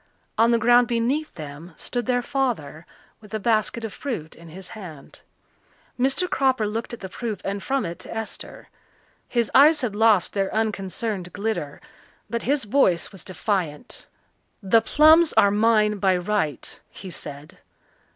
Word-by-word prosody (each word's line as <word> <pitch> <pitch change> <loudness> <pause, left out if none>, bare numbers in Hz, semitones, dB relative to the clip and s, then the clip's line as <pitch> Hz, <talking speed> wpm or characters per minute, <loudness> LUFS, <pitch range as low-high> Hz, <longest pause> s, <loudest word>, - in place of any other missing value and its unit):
On 230 +2 +4
the 235 - +4
ground 240 +1 +5
beneath 250 +6 0
them 155 +3 -9
stood 245 0 -4
their 245 -1 +1
father 235 - -2 0.3
with 215 0 -9
a - - -1
basket 225 +1 0
of 220 - -6
fruit 220 - -5
in 170 0 -14
his 185 +3 -10
hand. 170 -10 -11 0.8
Mr. 270 +8 +2
Cropper 260 -8 +1
looked 220 +2 -3
at 235 - -8
the 190 - -5
proof 215 +1 -5
and 200 0 -2
from 275 +3 -1
it 170 0 -6
to - - -9
Esther. 225 -1 -7 0.6
His 235 -3 0
eyes 300 +3 +6
had 230 -5 -2
lost 210 -4 +3
their 195 -1 -1
unconcerned 205 -3 -2
glitter, 205 -9 -3 0.5
but 235 0 -1
his 280 0 +1
voice 205 -7 +2
was 195 -4 -10
defiant. 185 -1 -3 0.6
"The 225 +4 +4
plums 315 +7 +5
are 200 - +5
mine 210 -1 +3
by 190 -1 +3
right," 180 -5 -2
he 190 -2 -10
said. 145 -1 -7
215 Hz, 155 wpm, -24 LUFS, 185-240 Hz, 0.8 s, eyes